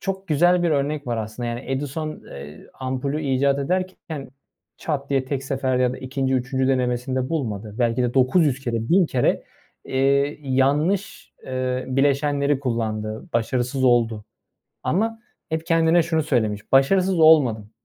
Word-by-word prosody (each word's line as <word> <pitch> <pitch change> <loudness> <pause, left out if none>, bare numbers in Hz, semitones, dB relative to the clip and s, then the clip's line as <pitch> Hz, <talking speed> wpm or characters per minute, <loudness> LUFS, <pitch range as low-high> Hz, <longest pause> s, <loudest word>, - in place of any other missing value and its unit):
çok 195 -1 -4
güzel 175 +4 +3
bir 170 - +2
örnek 145 0 -1
var 120 -1 -1
aslında, 110 +2 -4
yani, 120 +2 -4
Edison, 145 +3 -4
eee, 70 +2 -10
ampulü 135 +4 -2
icat 140 0 +1
ederken 165 -2 -3 0.5
çat 140 -3 -3
diye 135 -1 +1
tek 135 0 -3
seferde 130 -1 0
ya 125 -1 +2
da - - -7
2'nci 130 0 -2
3'üncü 130 +1 0
denemesinde 130 0 0
bulmadı. 110 -9 -3
Belki 120 0 +1
de 120 -1 -1
900 135 +1 +3
kere, 115 -3 -3
1000 180 0 +4
kere, 125 -4 +1 0.4
eee, 140 +2 +1
yanlış, 145 +9 0
eee, 130 0 -2
bileşenleri 140 +1 +1
kullandı, 110 -4 -3
başarısız 125 +3 0
oldu 115 -4 +2 0.6
ama 225 +5 -1 0.3
hep 160 0 -3
kendine 165 0 +4
şunu 160 -1 0
söylemiş: 110 -8 -1
“Başarısız 180 +7 +4
olmadım, 130 -10 +5
135 Hz, 140 wpm, -23 LUFS, 125-155 Hz, 0.6 s, olmadım